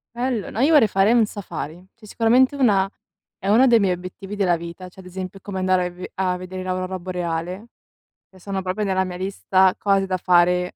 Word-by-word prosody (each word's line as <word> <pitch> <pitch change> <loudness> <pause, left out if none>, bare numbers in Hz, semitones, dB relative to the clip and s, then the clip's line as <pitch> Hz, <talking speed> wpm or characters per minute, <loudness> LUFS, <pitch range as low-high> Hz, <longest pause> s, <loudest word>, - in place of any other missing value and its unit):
Bello. 240 -4 -2
No, 225 - -6
io 300 +5 +4
vorrei 260 -8 +6
fare 195 +4 +3
un 235 -2 +4
safari, 180 -4 -7
cioè 220 -2 -17
sicuramente 250 +6 +3
una 200 -8 +3 0.5
è 195 - -7
uno 235 +6 +5
dei 235 -2 +5
miei 195 -3 +2
obiettivi 185 +3 -8
della 185 -4 +2
vita, 170 +2 -9
cioè 190 - -14
ad 185 - -17
esempio 185 +1 -7
come 190 -1 -6
andare 185 -1 +2
a - - -2
ve 180 +1 -9
a 185 -1 0
vedere 185 0 -7
l'aurora 185 0 -2
boreale, 180 +2 -4 0.6
che 190 - -19
sono 195 +1 -4
proprio 190 +3 -2
nella 190 -1 +1
mia 180 -1 -6
lista, 190 0 +2
cose 195 -1 +2
da 185 -1 -1
fare. 180 0 +2
190 Hz, 205 wpm, -22 LUFS, 180-205 Hz, 0.6 s, vorrei